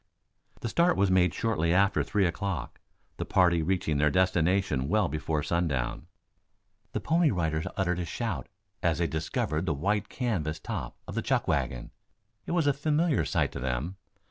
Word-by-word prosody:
The - - -2
start 170 +9 +3
was 95 -1 +3
made 90 -2 +4
shortly 85 -3 0
after 100 +1 +3
three 100 -2 +1
o'clock, 95 +1 -3 0.4
the - - -2
party 85 -2 +3
reaching 80 -3 0
their 75 +1 +4
destination 90 -4 +2
well 105 -1 +3
before 75 -1 -2
sundown. 70 -7 -1 0.9
The - - 0
Pony 165 0 +3
Riders 80 - -1
uttered 90 -2 0
a 90 - -2
shout 115 +7 -3 0.3
as 85 -3 +1
they 85 - +1
descried 80 +1 -2
the 80 - +1
white 105 +8 0
canvas 90 - -2
top - - -5
of - - -6
the - - -1
chuck - - 0
wagon. 60 -2 -1 0.6
It - - -2
was 170 -3 +2
a 145 - +4
familiar 155 +2 +1
sight - - 0
to - - -6
them. 65 +9 -2
90 Hz, 170 wpm, -28 LUFS, 80-105 Hz, 0.9 s, made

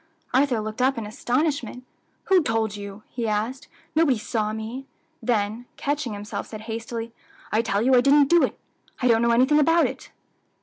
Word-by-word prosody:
Arthur 260 -2 +3
looked 215 +3 -5
up 265 0 +2
in 225 - -3
astonishment. 250 +2 -1 0.4
"Who 380 -2 +4
told 225 -6 -1
you?" 200 +1 -8
he 235 -2 -4
asked; 220 +6 -2 0.3
"nobody 310 -6 +3
saw 215 0 -2
me;" 225 +5 -6 0.3
then, 220 0 -1
catching 285 -5 -2
himself, 205 +1 -5
said 215 -1 -8
hastily, 230 +1 -5 0.4
"I 215 - +3
tell 215 -2 0
you 260 +2 +3
I 250 - +7
didn't 280 +2 +5
do 345 +3 +5
it. - - 0 0.4
I 250 - +1
don't 230 -1 +4
know 235 - +3
anything 260 +6 +4
about 330 +3 +4
it." - - -5
235 Hz, 175 wpm, -24 LUFS, 220-270 Hz, 0.4 s, I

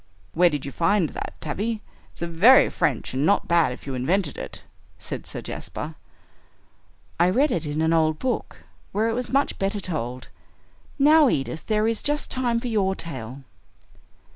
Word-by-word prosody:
"Where 175 +2 +5
did 145 -4 -4
you 140 - -5
find 170 +2 +2
that, - - -6
Tavie? 215 +8 -3 0.3
It's - - -17
very 170 +10 +6
French, 130 -4 -1
and 130 +2 0
not 200 +6 +2
bad 170 -5 +3
if 125 - -9
you 135 - -4
invented 155 +6 0
it," - - -7 0.3
said - - -5
Sir - - -5
Jasper. - - -6 1.3
"I 175 +1 +5
read 270 +9 +2
it 170 - -1
in 150 +2 -1
an 160 +1 +2
old 155 -1 +2
book, 255 +5 -3 0.3
where 215 +3 +1
it - - -1
was 245 +1 -3
much 275 +1 0
better 195 +2 -1
told. 125 -9 -4 0.7
Now, 300 0 +6
Edith, 150 +1 -3
there 215 0 +2
is 225 -1 0
just 295 0 -1
time 245 -3 +1
for 245 - -5
your 195 -4 +1
tale." 130 -5 -7
180 Hz, 170 wpm, -24 LUFS, 150-230 Hz, 1.3 s, very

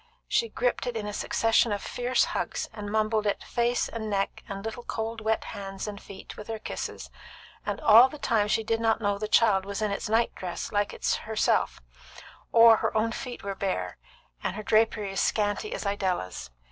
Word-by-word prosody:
She 465 - +1
gripped - - -1
it 240 -2 -2
in 210 - -4
a 210 - -4
succession 225 +2 +2
of 205 - 0
fierce 245 +5 +1
hugs, - - -2
and 205 -1 -6
mumbled 215 0 +1
it 205 - -1
face 240 +1 0
and 220 -2 -5
neck, 195 -1 -1
and 195 +1 -6
little 225 +2 -4
cold 225 -1 -4
wet 220 0 0
hands 195 -1 -6
and 205 -1 -6
feet 195 - -10
with 210 - -9
her 225 -1 -3
kisses; - - -6 0.6
and - - -2
all 230 +4 +8
the 300 - -9
time 220 -7 +1
she 220 +1 +1
did 225 +1 0
not 225 -1 +2
know 205 -2 0
the 215 - -2
child 210 -3 +4
was 200 +1 -4
in 215 -1 0
its 200 +2 -3
night 225 +2 +2
dress 180 -2 -5
like 205 -1 +1
herself, 220 0 +1 0.7
or 230 0 +8
that 225 - +6
her - - 0
own 225 +1 +1
feet 245 +1 -6
were 200 0 -3
bare, 95 - -3 0.5
and - - -2
her 215 - -5
drapery 215 -1 +2
as 195 - -1
scanty 210 - 0
as - - -4
Idella's. 185 - -2
215 Hz, 200 wpm, -27 LUFS, 200-225 Hz, 0.7 s, all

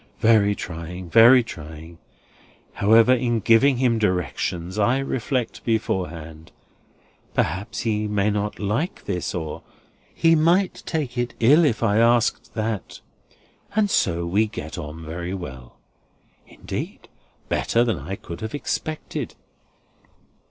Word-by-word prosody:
Very 105 -3 +4
trying, 85 +1 -7
very 120 +2 +8
trying. 80 -3 -10 0.7
However, 115 +4 +5
in 120 -2 +1
giving 115 +5 +4
him 120 -3 +2
directions, 90 -1 -2
I 120 +5 +3
reflect 130 -2 -2
beforehand: 80 -8 -3 0.8
'Perhaps 95 +4 -1
he 105 -2 -1
may 105 0 +1
not 105 0 -2
like 110 - -2
this,' 90 -3 -3
or 80 -3 -4 0.5
'He 165 0 +3
might 170 +4 +2
take 140 -7 -2
it 120 -1 -2
ill 145 +9 +6
if 120 -7 +1
I 105 -1 +3
asked 115 0 +2
that;' 110 -3 -3 0.7
and 210 -2 +2
so 85 -1 +1
we 100 +6 +2
get 80 -8 -7
on 75 +2 -7
very 85 +3 -4
well. 65 -9 -9 0.7
Indeed, - - -7 0.4
better 115 - +1
than 115 -9 -1
I 85 +8 -5
could 85 -3 -9
have 110 +5 -4
expected." 155 +2 -4
105 Hz, 125 wpm, -23 LUFS, 85-120 Hz, 0.8 s, very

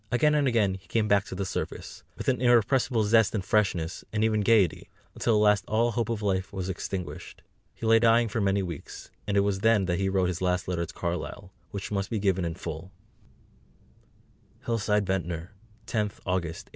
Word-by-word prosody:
Again 150 +5 +3
and 145 -2 +2
again 110 -6 +2
he 95 0 -10
came 110 -2 0
back 100 -1 +3
to - - -7
the 100 +1 -2
surface, - - -5 0.2
with - - -6
an 125 -2 +1
irrepressible 120 -1 +3
zest 110 +1 +3
and 95 -3 -2
freshness, 95 -5 0
and 105 0 0
even 110 -1 +2
gaiety, 105 -3 +2 0.2
until 115 - +1
at 105 - +3
last 105 -1 +3
all 115 +2 +2
hope 115 0 -1
of 110 -2 -2
life 95 -2 -1
was 95 -1 -4
extinguished. 95 -1 -6 0.3
He - - -7
lay 115 0 +6
dying 115 0 +4
for 110 +1 -2
many 100 0 +1
weeks, 85 -5 -8 0.2
and 100 -1 +1
it - - +5
was 100 -1 0
then 110 -2 +3
that 90 0 -1
he 95 0 +1
wrote 95 -2 +1
his 90 -1 -4
last 90 -1 0
letter 85 -2 -2
to - - -10
Carlyle, 90 +2 -4 0.2
which 100 0 -6
must 100 -1 -1
be 115 - -1
given 95 -3 +1
in 85 -1 -3
full: 80 +2 -7 1.7
HILLSIDE, 105 -3 +1
VENTNOR, 90 -2 -3 0.3
10th 105 -3 -1
August 85 -3 -2
1844. - - -25
100 Hz, 200 wpm, -27 LUFS, 95-110 Hz, 1.7 s, lay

